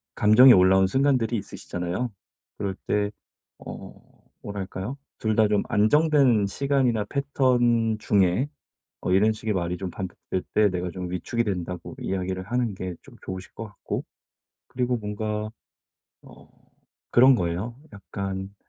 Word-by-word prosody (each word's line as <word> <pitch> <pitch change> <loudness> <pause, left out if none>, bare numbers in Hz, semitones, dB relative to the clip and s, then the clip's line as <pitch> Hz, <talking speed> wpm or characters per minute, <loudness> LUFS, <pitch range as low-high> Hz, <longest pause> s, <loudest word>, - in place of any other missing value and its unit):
감정이 120 +5 +8
올라온 95 +1 +5
순간들이 130 0 +2
있으시잖아요. 95 +2 -4 0.5
그럴 95 -1 -3
때 105 0 +1 0.5
어 - - -9 0.5
뭐랄까요? 100 +4 -5 0.2
2 110 -1 0
다 110 0 +4
좀 105 -1 +2
안정된 130 -1 +4
시간이나 125 -1 +1
패턴 120 -5 +1
중에 100 +6 +2 0.5
어 - - -2
"이런 105 +3 +4
식의 110 0 -3
말이 90 -1 -2
좀 95 -1 -5
반복될 95 0 -5
때 105 -1 +5
내가 90 0 -3
좀 90 0 -6
위축이 115 +6 -1
된다."고 90 -4 -4
이야기를 95 -1 -2
하는 120 +1 -1
게 95 -1 -5
좀 - - -16
좋으실 95 0 -7
것 115 - -7
같고 105 -2 -5 0.6
그리고 125 -1 -1
뭔가 105 0 -3 0.7
어 - - -16 0.6
그런 130 +2 +7
거예요. 95 +4 -2 0.2
약간 95 -1 -6
105 Hz, 275 characters per minute, -25 LUFS, 95-120 Hz, 0.7 s, 감정이